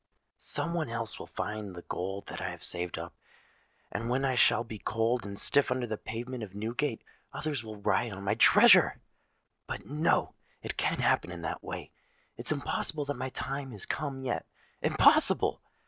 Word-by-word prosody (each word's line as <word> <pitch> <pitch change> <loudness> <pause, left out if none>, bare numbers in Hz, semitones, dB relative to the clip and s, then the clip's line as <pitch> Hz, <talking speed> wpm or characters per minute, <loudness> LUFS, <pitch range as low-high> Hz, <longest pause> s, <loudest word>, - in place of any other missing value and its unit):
Some 170 - +5
one 165 -7 -1
else 115 -1 -3
will - - -8
find 105 -3 -5
the 85 - -9
gold 95 +2 -4
that - - -7
I 90 - -2
have 90 -2 -9
saved 90 -1 -3
up; - - -6 0.8
and 115 - -3
when 130 +2 +1
I 130 - +2
shall 120 -1 +4
be 110 -2 -8
cold 115 +2 0
and 100 0 -7
stiff 140 +6 +3
under 125 0 0
the 110 -2 -3
pavement 120 +3 -6
of 100 -3 -7
Newgate, 115 +4 -2 0.3
others 145 -6 -3
will 110 -1 -8
riot 105 +3 +1
on 95 0 -8
my 100 - +1
treasure! - - +7 0.7
But, - - -5
no—it 150 +4 -1
can't - - 0
happen - - +2
in 85 -2 -7
that - - -3
way: - - -6 0.4
it's - - -5
impossible 150 -2 -2
that 145 - -2
my 130 +1 -3
time 135 +1 -4
is 100 - -7
come 140 -3 -3
yet—impossible! 125 -2 +2
115 Hz, 175 wpm, -30 LUFS, 100-130 Hz, 0.8 s, treasure